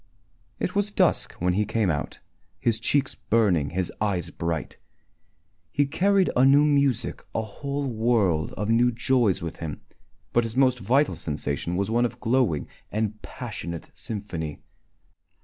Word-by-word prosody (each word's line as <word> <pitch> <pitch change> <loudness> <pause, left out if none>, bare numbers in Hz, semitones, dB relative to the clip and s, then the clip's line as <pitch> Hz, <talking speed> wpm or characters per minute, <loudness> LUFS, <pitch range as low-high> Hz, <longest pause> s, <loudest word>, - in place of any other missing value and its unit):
It - - -1
was 205 0 +1
dusk - - +1
when 90 +1 0
he 105 +3 +2
came 105 -3 +1
out, 75 - -4 0.4
his 115 -2 +1
cheeks 135 +4 +1
burning, 95 -11 +2
his 90 +2 -2
eyes 90 -5 0
bright. 85 -3 -3 0.9
He 145 - +2
carried 190 +6 +2
a 125 - +5
new 140 +2 +6
music, 140 -5 +1
a 110 - +1
whole 140 +6 -4
world 110 - +1
of 105 - -3
new 120 +2 +4
joys 120 -6 +1
with 85 - -5
him, 80 -3 -6 0.5
but 120 - +4
his 115 +1 -4
most 130 -2 +4
vital 130 - +2
sensation 75 0 -3
was 100 +3 -1
one 120 +1 +3
of 120 +1 -4
glowing 120 - +1 0.2
and 105 0 -2
passionate 85 -1 -7
sympathy. 85 -8 -6
110 Hz, 150 wpm, -26 LUFS, 90-130 Hz, 0.9 s, new